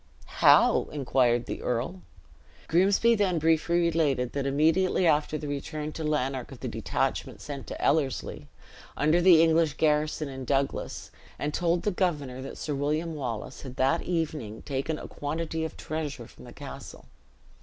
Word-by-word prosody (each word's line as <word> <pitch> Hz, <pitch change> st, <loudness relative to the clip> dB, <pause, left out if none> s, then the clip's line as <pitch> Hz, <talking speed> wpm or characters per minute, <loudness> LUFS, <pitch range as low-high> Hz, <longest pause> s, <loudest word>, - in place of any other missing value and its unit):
"How?" -, -, +6 dB
inquired 125 Hz, -4 st, +1 dB
the -, -, -5 dB
earl. 125 Hz, +10 st, -2 dB, 0.7 s
Grimsby 195 Hz, +7 st, +4 dB
then 200 Hz, -5 st, +1 dB
briefly 165 Hz, +2 st, +2 dB
related, 155 Hz, -7 st, +1 dB
that 140 Hz, -1 st, -1 dB
immediately 160 Hz, +7 st, +2 dB
after 155 Hz, -1 st, +2 dB
the 150 Hz, -, -6 dB
return 150 Hz, +2 st, -4 dB
to 160 Hz, -, -6 dB
Lanark 135 Hz, -4 st, -1 dB
of -, -, -10 dB
the -, -, -3 dB
detachment -, -, -2 dB
sent 140 Hz, -3 st, -7 dB
to -, -, -6 dB
Ellerslie, 135 Hz, -, 0 dB, 0.5 s
under 155 Hz, +4 st, +3 dB
the 170 Hz, -3 st, +7 dB
English 160 Hz, -2 st, +3 dB
garrison 150 Hz, 0 st, +1 dB
in 135 Hz, -1 st, -7 dB
Douglas, 135 Hz, +1 st, -2 dB, 0.3 s
and 150 Hz, 0 st, -3 dB
told 170 Hz, 0 st, +1 dB
the 210 Hz, -, +1 dB
governor 150 Hz, -9 st, -1 dB
that 135 Hz, -, -8 dB
Sir 150 Hz, -, -3 dB
William 150 Hz, +4 st, -1 dB
Wallace 130 Hz, -4 st, -5 dB
had 130 Hz, -2 st, -9 dB
that 135 Hz, +6 st, +2 dB
evening 155 Hz, -11 st, -3 dB
taken 140 Hz, +3 st, -2 dB
a -, -, -8 dB
quantity 160 Hz, +2 st, -3 dB
of 160 Hz, -, -5 dB
treasure 155 Hz, -2 st, -4 dB
from -, -, -15 dB
the -, -, -12 dB
castle. -, -, -10 dB
150 Hz, 155 wpm, -27 LUFS, 135-165 Hz, 0.7 s, the